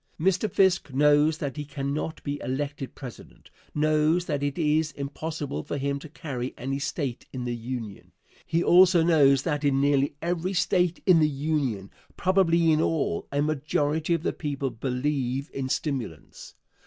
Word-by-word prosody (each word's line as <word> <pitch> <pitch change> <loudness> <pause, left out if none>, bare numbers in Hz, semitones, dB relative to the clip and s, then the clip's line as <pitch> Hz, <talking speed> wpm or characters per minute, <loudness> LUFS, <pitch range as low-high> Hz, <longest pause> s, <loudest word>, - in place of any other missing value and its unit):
Mr. 190 +5 +1
Fisk 190 -6 +2
knows 150 +3 +4
that 145 -2 -4
he 150 - -3
cannot 145 +2 -4
be 145 0 -3
elected 140 +1 -4
President 125 -4 -11 0.2
knows 155 +3 +2
that 145 -4 -2
it 145 -1 -2
is 155 -1 +1
impossible 145 - -4
for 145 - -4
him 140 0 -1
to 155 - -11
carry 130 -5 -5
any 135 +2 -3
State 140 -3 -3
in 125 -2 -5
the 120 -1 -2
Union. 115 -4 -7 0.3
He 170 +1 0
also 180 -1 +6
knows 140 -5 +4
that 150 -3 -1
in 140 -2 +2
nearly 140 0 +2
every 175 +3 -2
State 180 -1 +1
in 180 -4 +6
the 155 -1 +4
Union 135 -9 -2 0.3
probably 170 -3 +3
in 155 0 +3
all 155 - -1
a 145 +1 +1
majority 155 +2 0
of 165 - -4
the - - 0
people 140 -3 -3
believe 130 +3 -2
in 130 -1 -3
stimulants. 130 - -4
145 Hz, 160 wpm, -26 LUFS, 135-160 Hz, 0.3 s, also